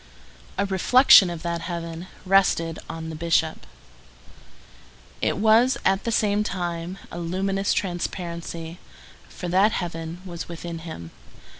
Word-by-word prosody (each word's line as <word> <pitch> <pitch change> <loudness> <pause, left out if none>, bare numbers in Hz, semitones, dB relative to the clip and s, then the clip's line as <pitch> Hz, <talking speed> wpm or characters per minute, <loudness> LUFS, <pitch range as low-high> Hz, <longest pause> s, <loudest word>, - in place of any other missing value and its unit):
A 200 - +1
reflection 195 +1 +6
of 170 -1 -6
that 170 -1 -2
heaven 170 0 -5 0.2
rested 185 -4 +2
on 160 0 -6
the - - -6
Bishop. 160 0 0 1.5
It - - 0
was, 225 +5 +4
at 190 +1 +2
the 230 - 0
same 210 -2 +2
time, 175 -2 -4
a 170 - -6
luminous 195 +3 -1
transparency, 170 -2 -4 0.5
for 180 - -7
that 195 +5 +4
heaven 165 -1 -4
was 175 -2 -7
within 170 0 -6
him. 160 - -8
175 Hz, 125 wpm, -24 LUFS, 165-195 Hz, 1.5 s, reflection